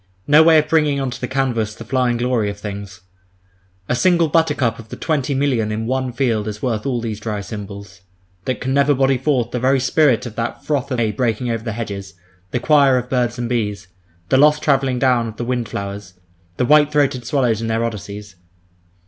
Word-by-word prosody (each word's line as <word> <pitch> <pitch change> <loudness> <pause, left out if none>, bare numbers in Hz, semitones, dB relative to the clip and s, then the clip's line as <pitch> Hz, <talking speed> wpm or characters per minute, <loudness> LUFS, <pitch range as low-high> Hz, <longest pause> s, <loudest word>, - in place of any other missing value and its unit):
No 150 +2 +6
way 160 0 +6
of 155 - +2
bringing 150 -3 +2
on 135 -2 -2
to - - -8
the 125 - -2
canvas 120 -5 -1
the 115 - -10
flying 125 0 +1
glory 120 -3 0
of 100 - -6
things! 100 -2 -7 0.9
A - - 0
single 170 +4 +3
buttercup 145 -8 +1
of 110 -1 -12
the - - -7
twenty 145 -4 -1
million 130 -6 0
in 110 +1 -3
one 130 +1 -1
field 115 -4 0
is 105 0 -5
worth 115 -1 -2
all 125 -3 0
these 110 -2 -4
dry 105 -1 -3
symbols—that 95 0 -8
can 130 +1 -2
never 140 +1 +3
body 135 0 +2
forth 130 -4 0
the 125 - -2
very 130 +2 +2
spirit 130 -2 +2
of 115 -3 -7
that 115 0 -4
froth 140 -3 -1
of 130 - -2
May 115 -2 +1
breaking 120 +1 -1
over 115 -1 -3
the 115 -2 -3
hedges, 100 -4 -6 0.3
the 120 - -1
choir 140 -1 +4
of 125 0 -4
birds 125 -2 0
and 120 0 -2
bees, 105 -5 -2 0.4
the 130 - +4
lost 150 +2 +4
travelling 135 -3 +2
down 125 -2 +2
of 110 - -8
the 120 - -3
wind 120 -2 -2
flowers, 100 -2 -6 0.4
the 125 - +1
white 150 +2 +5
throated 140 -4 +1
swallows 120 -4 0
in 115 - -3
their 115 +1 0
Odysseys. 105 -2 -7
120 Hz, 210 wpm, -19 LUFS, 110-135 Hz, 0.9 s, No